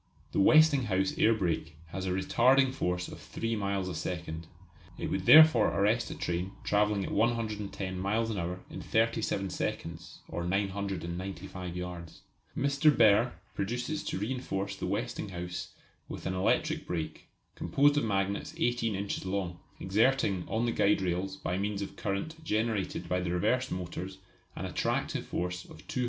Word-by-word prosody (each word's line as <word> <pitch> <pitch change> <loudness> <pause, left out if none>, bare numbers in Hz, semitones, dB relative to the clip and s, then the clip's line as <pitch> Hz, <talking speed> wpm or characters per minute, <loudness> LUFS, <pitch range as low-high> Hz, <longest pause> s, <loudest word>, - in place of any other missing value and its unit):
The - - 0
Westinghouse 125 -7 +5
air 115 +1 +5
brake 85 -5 -1
has 95 +3 -4
a - - 0
retarding 130 +8 +3
force 90 -7 -1
of - - -9
three 115 0 -3
miles 100 -2 -1
a 90 - -3
second. 85 -1 -4 0.5
It - - -3
would 95 -1 -2
therefore 155 -8 +9
arrest 105 +6 +1
a - - -5
train 90 +2 -2
travelling 105 -1 +2
at - - -5
110 105 -5 -1
miles 110 +4 0
per 100 - -3
hour 90 +2 -3
in - - -6
37 110 -4 0
seconds, 85 -1 -4
or 85 +2 -4
995 95 -1 -3
yards. 90 -2 -7 0.4
Mr. 140 +2 +4
Behr 115 -3 +5 0.2
proposes 125 +9 -2
to - - -2
reinforce 100 -3 -2
the 95 - -4
Westinghouse 95 -5 -3 0.4
with - - -7
an 95 - -1
electric 150 +12 +1
brake, 80 -3 -4 0.3
composed 145 +1 +3
of 145 - +2
magnets 100 -2 -1
18 120 -3 +1
inches 100 +1 -3
long, 95 -2 -3 0.2
exerting 105 -1 +2
on 115 +1 0
the 120 - +1
guide 100 -3 +3
rails 95 +2 -1
by 90 -1 -2
means 100 0 -1
of 100 - -8
current 130 +12 -3
generated 110 - -1
by 90 - +1
the 90 -1 -2
reversed 110 +9 +1
motors 90 +1 -5 0.4
an - - -4
attractive - - -1
force 90 0 -3
of - - -14
200 - - -29
lbs. - - -4
100 Hz, 155 wpm, -30 LUFS, 90-115 Hz, 0.5 s, therefore